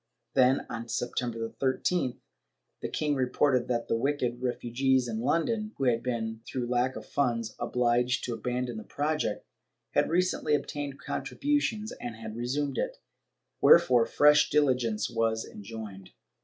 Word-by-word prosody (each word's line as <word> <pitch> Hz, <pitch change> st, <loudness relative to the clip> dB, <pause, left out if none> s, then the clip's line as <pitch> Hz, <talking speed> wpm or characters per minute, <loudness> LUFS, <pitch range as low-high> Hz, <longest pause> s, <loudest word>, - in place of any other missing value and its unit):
Then, 130 Hz, +1 st, +4 dB
on 115 Hz, 0 st, -6 dB
Septem 120 Hz, +1 st, -2 dB
ber 115 Hz, -1 st, -4 dB
13th, 130 Hz, +4 st, -1 dB, 0.6 s
the -, -, -3 dB
king 150 Hz, -1 st, 0 dB
reported 130 Hz, -1 st, +2 dB
that 120 Hz, -2 st, -1 dB
the -, -, +1 dB
wicked 125 Hz, -1 st, -1 dB
refugees 130 Hz, +1 st, +1 dB
in 110 Hz, -1 st, -3 dB
London, 215 Hz, -, 0 dB
who 135 Hz, -, -2 dB
had 120 Hz, -3 st, +2 dB
been, 110 Hz, -3 st, -3 dB
through 125 Hz, -2 st, -3 dB
lack 125 Hz, +1 st, +1 dB
of -, -, -7 dB
funds, 115 Hz, -5 st, -1 dB
obliged 125 Hz, +1 st, +1 dB
to 120 Hz, -, -2 dB
abandon 125 Hz, +1 st, -3 dB
the 110 Hz, -, -6 dB
project, 150 Hz, +2 st, -2 dB, 0.5 s
had -, -, +2 dB
recently 170 Hz, -3 st, +2 dB
obtained 145 Hz, 0 st, -4 dB
contributions 220 Hz, -, -1 dB
and 120 Hz, -2 st, -6 dB
had 110 Hz, -1 st, -8 dB
resumed 135 Hz, +3 st, -2 dB
it, -, -, -2 dB, 0.6 s
wherefore 120 Hz, -2 st, +6 dB
fresh 150 Hz, 0 st, +5 dB
diligence 125 Hz, -7 st, +2 dB
was 115 Hz, -1 st, 0 dB
enjoined. 100 Hz, -3 st, -9 dB
125 Hz, 140 wpm, -29 LUFS, 115-145 Hz, 0.6 s, wherefore